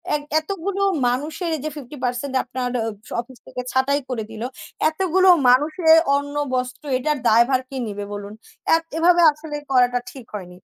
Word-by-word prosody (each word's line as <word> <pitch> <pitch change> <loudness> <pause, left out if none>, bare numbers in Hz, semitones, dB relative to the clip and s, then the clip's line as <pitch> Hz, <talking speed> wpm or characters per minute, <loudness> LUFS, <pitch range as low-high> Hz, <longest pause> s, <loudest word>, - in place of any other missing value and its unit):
এক 295 - -2 0.2
এতগুলো 390 +3 -4 0.3
মানুষের, 310 +8 -2
এইযে 305 +3 -4
50% 260 -1 -4
আপনার 255 0 -4 0.2
অ - - -1 0.3
অফিস 240 +1 -7
থেকে 250 - -5
ছাঁটাই 280 +2 +1
করে 230 -4 -2
দিল, 220 0 -8 0.5
এতগুলো 375 +3 +2 0.2
মানুষের 310 +5 +4 0.2
অন্ন-বস্ত্র, 285 -2 -3
এটার 300 +3 -1
দায়ভার 240 +4 +4
কে 270 - -8
নেবে 205 0 -5
বলুন? 205 0 -7 0.3
অ্যা - - +6 0.2
এভাবে 345 +1 +4
আসলে 300 0 -8 0.2
করাটা 245 -1 +3
ঠিক 255 -3 -11
হয়নি। 185 -3 -7
270 Hz, 145 wpm, -22 LUFS, 245-310 Hz, 0.5 s, অ্যা